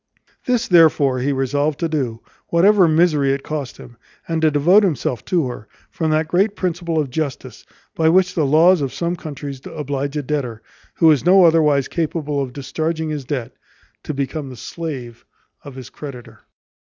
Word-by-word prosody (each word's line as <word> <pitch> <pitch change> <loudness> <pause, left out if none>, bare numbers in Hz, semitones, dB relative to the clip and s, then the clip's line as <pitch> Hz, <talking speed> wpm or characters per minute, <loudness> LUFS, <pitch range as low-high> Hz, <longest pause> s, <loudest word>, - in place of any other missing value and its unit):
This 250 -2 0
therefore 155 -7 +4
he 135 +3 0
resolved 145 +2 -1
to 165 - +1
do, 130 -8 -3 0.3
whatever 190 +2 +4
misery 155 -4 +3
it 140 - -4
cost 150 -4 -5
him, 120 -1 -14 0.3
and 165 -1 -1
to 160 - +4
devote 160 +8 +4
himself 145 - -1
to 170 -5 +1
her, 115 -3 -8 0.2
from 160 - -2
that 155 0 +1
great 195 +5 +1
principle 170 -2 -2
of 145 -4 -1
justice, 150 -2 -5 0.3
by 160 0 +2
which 180 +1 +3
the 165 - 0
laws 165 +4 +5
of 135 -2 -2
some 170 +1 -2
countries 145 -5 -8
oblige 145 0 -4
a 150 - -2
debtor, 125 -6 -3 0.3
who 165 -2 +5
is 145 - +2
no 185 +1 +6
otherwise 150 -5 +3
capable 150 -3 -2
of 130 -2 -4
discharging 155 +4 -3
his 145 -3 -5
debt, 130 -4 -4 0.5
to 150 - -5
become 140 +1 -4
the 125 - -10
slave 130 -9 -7 0.4
of 140 -3 -11
his 130 -2 -10
creditor. 135 -5 -10
150 Hz, 175 wpm, -20 LUFS, 135-165 Hz, 0.5 s, no